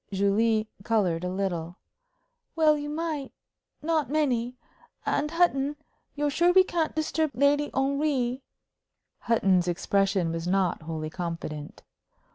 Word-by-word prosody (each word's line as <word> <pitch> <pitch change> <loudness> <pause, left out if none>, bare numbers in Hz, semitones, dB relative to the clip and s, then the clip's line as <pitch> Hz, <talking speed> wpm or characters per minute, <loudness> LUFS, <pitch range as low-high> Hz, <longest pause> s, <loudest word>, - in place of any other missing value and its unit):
Julie 215 +3 +2 0.2
colored 190 -7 +1
a 180 - -1
little. 180 -3 -3 0.8
"Well, 310 -2 +5
you 295 0 -4
might 305 -3 -3 0.5
not 310 -5 0
many. 255 -5 0 0.5
And, 300 +1 0
Hutton, 295 -4 +2 0.4
you're 295 0 0
sure 345 +4 +3
we 375 +1 +7
can't 335 -3 -1
disturb 315 0 0
Lady 285 +3 +3
Henry?" 270 -2 0 0.8
Hutton's 195 -6 +2
expression 190 0 +1
was 165 +1 -4
not 190 -2 +1
wholly 155 -1 -5
confident. 165 -4 -6
240 Hz, 115 wpm, -27 LUFS, 185-295 Hz, 0.8 s, we